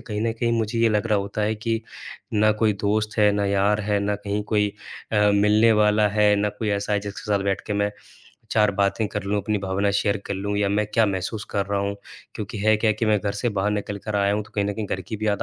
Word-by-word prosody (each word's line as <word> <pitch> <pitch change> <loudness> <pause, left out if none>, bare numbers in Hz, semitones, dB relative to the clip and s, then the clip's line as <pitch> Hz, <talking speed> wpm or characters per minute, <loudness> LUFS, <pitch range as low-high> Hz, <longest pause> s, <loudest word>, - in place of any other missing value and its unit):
कहीं 105 -2 -5
न 115 0 0
कहीं 115 +1 -1
मुझे 115 0 -1
ये 115 0 +4
लग 105 +1 0
रहा 105 -2 +2
होता 100 +2 -4
है 110 +1 +1
कि 115 +1 -2 0.5
ना 110 +1 +4
कोई 110 -1 +4
दोस्त 105 +1 -1
है 105 -1 +5
ना 100 0 0
यार 100 +2 +2
है 105 0 0
ना 100 0 0
कहीं 105 0 -3
कोई 105 -1 +1 0.4
अ, - - +1 0.2
मिलने 105 +3 +4
वाला 105 0 +3
है 105 0 +3
ना 105 +1 +1
कोई 110 - -2
ऐसा 100 +1 -1
है 105 - +2
जिसके 100 0 -7
साथ 100 -1 +1
बैठ 100 -1 0
के - - -2
मैं 105 0 0 0.6
4 105 -2 +3
बातें 100 +2 +1
कर 105 - -4
लूँ 105 +1 0
अपनी 105 -1 -1
भावना 100 +1 0
शेयर 100 0 +1
कर - - -2
लूँ 100 +2 -3
या 100 -1 +2
मैं 105 +1 +1
क्या 115 - +5
महसूस 100 +2 -3
कर 100 -1 -1
रहा 100 0 -1
हूँ? 100 0 -2 0.4
क्योंकि 105 +1 -6
है 110 +2 +3
क्या 110 +1 +2
कि 110 +1 -2
मैं 105 -1 +3
घर 100 -1 -2
से 110 +4 -1
बाहर 105 -1 0
निकल 105 -1 -3
कर 105 -1 -1
आया 100 0 +2
हूँ 105 - -1
तो - - -18
कहीं 100 - +1
न 100 - -1
कहीं 110 -2 -4
घर 95 - -3
की 105 +4 -6
भी 110 - -3
याद 100 -1 +1
105 Hz, 270 wpm, -23 LUFS, 100-110 Hz, 0.6 s, है